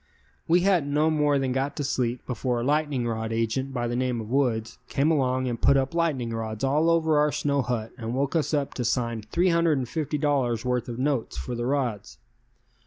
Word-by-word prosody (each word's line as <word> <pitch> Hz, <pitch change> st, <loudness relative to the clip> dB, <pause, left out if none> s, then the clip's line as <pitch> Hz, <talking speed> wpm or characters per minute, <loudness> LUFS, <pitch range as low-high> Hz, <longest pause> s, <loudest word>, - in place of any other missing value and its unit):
We 175 Hz, +2 st, +4 dB
hadn't 175 Hz, -7 st, +2 dB
no 155 Hz, +2 st, +3 dB
more 150 Hz, -2 st, +2 dB
than 135 Hz, -1 st, 0 dB
got 135 Hz, +2 st, -1 dB
to 145 Hz, -, -3 dB
sleep 125 Hz, -3 st, -1 dB
before 125 Hz, -1 st, -2 dB
a -, -, -2 dB
lightning 145 Hz, -2 st, 0 dB
rod 110 Hz, -1 st, -3 dB
agent 115 Hz, +4 st, -1 dB
by 120 Hz, -2 st, -2 dB
the 120 Hz, -, -2 dB
name 125 Hz, -1 st, 0 dB
of 110 Hz, 0 st, -7 dB
Woods 120 Hz, -5 st, 0 dB
came 145 Hz, +4 st, +2 dB
along 130 Hz, -3 st, +1 dB
and 120 Hz, -2 st, -3 dB
put 140 Hz, -, +5 dB
up 135 Hz, +2 st, 0 dB
lightning 150 Hz, -9 st, 0 dB
rods 110 Hz, 0 st, -4 dB
all 150 Hz, +5 st, +2 dB
over 160 Hz, -2 st, +3 dB
our 150 Hz, 0 st, +3 dB
snow 140 Hz, -1 st, 0 dB
hut 115 Hz, -3 st, -3 dB
and 115 Hz, +1 st, -3 dB
woke 140 Hz, +4 st, -1 dB
us 160 Hz, -, +1 dB
up 145 Hz, -3 st, -1 dB
to 125 Hz, -, -3 dB
sign 115 Hz, -1 st, -1 dB
$350 145 Hz, -, 0 dB
worth 125 Hz, -1 st, -1 dB
of 115 Hz, -, -5 dB
notes 130 Hz, -, -1 dB
for 65 Hz, -, -4 dB
the 120 Hz, 0 st, -2 dB
rods. 125 Hz, -6 st, -2 dB
130 Hz, 200 wpm, -26 LUFS, 120-150 Hz, -, put